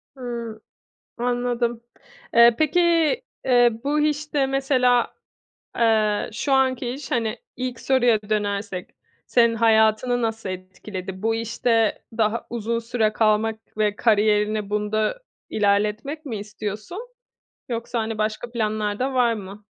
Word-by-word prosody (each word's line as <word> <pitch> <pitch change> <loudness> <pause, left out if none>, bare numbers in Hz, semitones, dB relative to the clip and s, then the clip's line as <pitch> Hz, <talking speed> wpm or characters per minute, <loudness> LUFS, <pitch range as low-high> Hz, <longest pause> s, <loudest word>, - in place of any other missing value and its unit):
Hıı. 235 -4 -6 0.6
Anladım. 240 -1 -1 0.5
Eee, 235 0 +7
peki, 310 +3 +3 0.6
eee, 245 -2 +5
bu 295 +2 +1
işte 295 -2 0
mesela, 260 -3 +2 0.6
eee, 220 -2 +2
şu 255 +6 -2
anki 260 -2 +2
iş, 275 +3 -7
hani, 230 -1 -1 0.2
ilk 255 -1 -4
soruya 245 -5 +3
dönersek 205 -3 -2 0.4
senin 235 -1 +3
hayatını 225 +2 +3
nasıl 225 -2 -2
etkiledi? 185 +1 -7
Bu 225 +1 +1
işte 230 0 0 0.2
daha 220 +1 +1
uzun 235 0 -2
süre 230 -2 0
kalmak 220 0 +1 0.2
ve 210 -1 +1
kariyerini 210 -2 +2
bunda 215 - -1 0.3
ilerletmek 210 +9 0
mi 235 -5 -3
istiyorsun? 215 - -6 0.6
Yoksa, 235 0 -3
hani, 220 -1 -2
başka 215 +2 -2
planlar 215 -3 -1
da 265 +1 -1
var 240 -2 +3
mı? 200 0 -9
225 Hz, 120 wpm, -23 LUFS, 215-245 Hz, 0.6 s, Eee